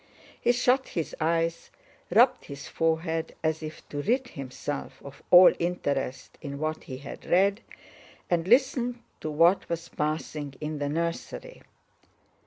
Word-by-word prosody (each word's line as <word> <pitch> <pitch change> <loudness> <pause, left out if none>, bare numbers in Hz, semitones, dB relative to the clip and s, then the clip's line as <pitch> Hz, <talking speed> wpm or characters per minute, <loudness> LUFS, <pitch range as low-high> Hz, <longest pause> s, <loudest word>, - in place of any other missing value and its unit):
He - - +4
shut 255 +2 +2
his 165 -3 -4
eyes, 165 +1 0 0.4
rubbed 245 +3 +4
his 140 -1 -8
forehead 160 0 -1
as 160 0 0
if 155 0 -8
to 145 - -3
rid 250 - 0
himself 140 +1 -6
of 140 0 -11
all 180 +1 +9
interest 145 -7 -2
in 140 -2 -6
what 155 +1 -3
he 130 - -6
had 140 - -9
read, 195 +4 +3 0.7
and 170 -1 0
listened 245 0 +3 0.2
to 155 - -4
what 165 +5 +3
was 170 0 -4
passing 150 -2 -3
in 150 0 -4
the 145 0 -1
nursery. 170 - -4
165 Hz, 140 wpm, -27 LUFS, 150-195 Hz, 0.7 s, all